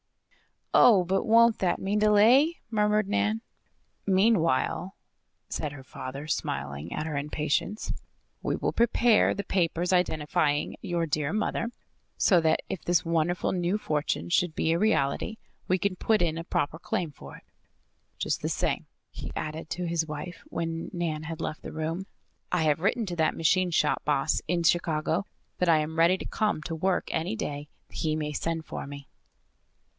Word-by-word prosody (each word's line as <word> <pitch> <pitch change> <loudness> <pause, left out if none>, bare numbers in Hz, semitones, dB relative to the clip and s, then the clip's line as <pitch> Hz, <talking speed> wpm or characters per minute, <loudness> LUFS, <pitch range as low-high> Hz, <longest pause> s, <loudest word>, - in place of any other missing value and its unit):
"Oh! 210 -7 +7
But 190 +4 0
won't 230 0 +5
that 180 -2 +1
mean 200 +2 -1
delay?" 225 +10 +5
murmured 210 -1 +2
Nan. 215 +2 0 0.7
"Meanwhile," 190 - +2 0.5
said 150 -2 -3
her 135 -2 -10
father, 135 +2 -7
smiling 70 - -3
at - - -3
her 155 -3 -3
impatience, 150 +8 -1 0.5
"we - - -1
will - - -1
prepare 235 -1 +4
the 200 - -3
papers 180 -1 0
identifying 150 -4 +1
your 170 -1 -1
dear 150 0 -1
mother 215 +2 -1 0.5
so 180 -5 +5
that, 160 -1 +2
if 180 - -5
this 175 0 +2
wonderful 165 +1 +1
new 180 +2 0
fortune 150 - -2
should 170 - +1
be 160 - +1
a 165 - +2
reality, 170 +2 +1 0.3
we 185 - +3
can 185 0 -1
put 220 +1 +2
in 165 -2 +1
a 165 - -5
proper 160 -3 -1
claim 170 -1 -2
for 70 - -12
it. - - -15 0.7
Just - - -1
the - - -1
same," - - -1 0.2
he - - -7
added 155 +1 -5
to 180 0 -2
his 165 -1 0
wife, 155 +3 -6
when 165 0 -3
Nan 165 -3 -2
had 165 0 -6
left 155 - -4
the - - -8
room, 165 +4 -3 0.4
"I 180 -2 +2
have 150 -1 +2
written 215 +5 +1
to 175 - -3
that 160 -1 +2
machine 180 +3 +2
shop 150 -2 +1
boss 145 0 +1
in 170 +1 0
Chicago 165 +2 +1 0.3
that 180 - +2
I 165 - +6
am 160 +1 -3
ready 170 +3 +5
to - - -7
come 210 -8 -1
to 165 - -4
work 180 +3 0
any 170 +6 -1
day 145 -8 -4 0.2
he 155 -1 -1
may 150 -1 -2
send 165 +2 -2
for - - -6
me." 140 0 -9
170 Hz, 170 wpm, -28 LUFS, 155-190 Hz, 0.7 s, Oh